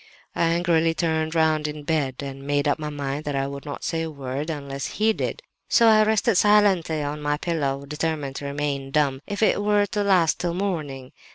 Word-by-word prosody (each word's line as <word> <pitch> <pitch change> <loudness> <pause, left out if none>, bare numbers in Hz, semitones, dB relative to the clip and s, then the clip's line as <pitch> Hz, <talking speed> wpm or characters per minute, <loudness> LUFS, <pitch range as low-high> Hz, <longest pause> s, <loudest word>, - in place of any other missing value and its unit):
"I - - +2
angrily 165 -1 +2
turned 160 -1 -1
round 155 -1 +2
in 150 0 -6
bed 145 -4 -1
and 135 -1 -7
made 145 +1 0
up 145 - +1
my 150 -1 -4
mind 145 0 -4
that 145 -1 -2
I 135 0 0
would 140 +1 -7
not 145 - -6
say 165 -1 -1
a 165 - -3
word 140 +1 -5
unless 140 -3 -4
he 220 +1 +2
did; - - -4 0.3
so 235 - +5
I 215 -1 +6
rested 220 0 +2
silently 195 -7 +3
on 145 +1 -4
my 145 0 0
pillow 140 -4 -2
determined 150 -2 -3
to 145 - -6
remain 140 -1 -3
dumb, 135 -2 +1
if 205 +2 -2
it 210 - +3
were 205 0 +3
to 205 +1 -2
last 185 -5 +3
till 175 -1 -2
morning. 150 -9 -3
155 Hz, 205 wpm, -24 LUFS, 140-175 Hz, 0.3 s, I